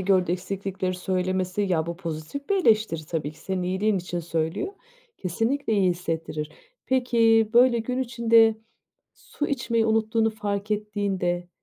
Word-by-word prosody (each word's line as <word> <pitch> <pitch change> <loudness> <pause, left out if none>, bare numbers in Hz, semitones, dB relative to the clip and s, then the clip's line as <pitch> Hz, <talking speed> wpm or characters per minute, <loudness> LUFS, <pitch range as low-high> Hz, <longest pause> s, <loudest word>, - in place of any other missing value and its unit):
gördüğü 185 -2 +2
eksiklikleri 185 0 -3
söylemesi, 185 +1 -1
ya, 175 -5 0
bu 170 0 -4
pozitif 170 - -6
bir 400 - +2
eleştiri 215 - +2
tabii 155 -3 -3
ki 155 - -19
senin 190 -1 -3
iyiliğin 190 +3 +1
için 175 0 -4
söylüyor. 165 - -2 0.4
Kesinlikle 225 +8 -1
iyi 195 -4 +3
hissettirir. 165 -3 -3 0.4
Peki, 230 -4 +3
böyle, 240 0 +6
gün 250 +3 -2
içinde 230 -3 +4 0.6
su 295 - -5
içmeyi 235 -4 0
unuttuğunu 220 0 +2
fark 205 -1 -3
ettiğinde 200 -4 -1
200 Hz, 135 wpm, -25 LUFS, 180-225 Hz, 0.6 s, böyle